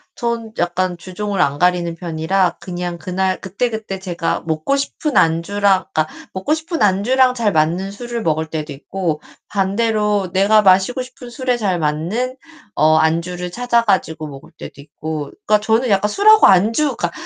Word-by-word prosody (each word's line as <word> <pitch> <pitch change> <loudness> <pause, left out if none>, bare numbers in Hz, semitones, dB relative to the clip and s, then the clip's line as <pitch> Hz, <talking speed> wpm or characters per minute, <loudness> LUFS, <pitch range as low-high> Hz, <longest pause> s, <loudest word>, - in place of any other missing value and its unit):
전 235 -2 -3
약간 175 +1 -1
주종을 195 +2 -3
안 145 -3 +1
가리는 175 -1 +2
편이라 170 +2 0
그냥 175 -1 -5
그날 185 +1 -1
그때그때 210 0 -3
제가 175 -3 -2
먹고 160 - 0
싶은 280 +1 -2
안주랑 185 +3 +2
그러니까 155 0 +1 0.3
먹고 190 +11 -1
싶은 320 +1 -3
안주랑 245 +6 +3
잘 230 -4 0
맞는 170 +4 0
술을 235 +2 -5
먹을 160 0 0
때도 155 -1 -4
있고 155 +3 -3 0.3
반대로 205 -1 0
내가 200 +3 +4
마시고 195 +6 +3
싶은 250 -1 -10
술에 250 0 -1
잘 195 -6 -1
맞는 175 - -2 0.4
어 155 +1 +4
안주를 170 +3 0
찾아 240 +2 +1
가지고 160 -7 0
먹을 140 -1 -12
때도 - - -10
있고. 150 +1 -6
그러니까 210 0 +4
저는 225 +4 +1
약간 205 +1 +2
술하고 430 - +6
안주 225 +9 +3
그러니까 - - -2
190 Hz, 345 characters per minute, -18 LUFS, 170-230 Hz, 0.4 s, 술하고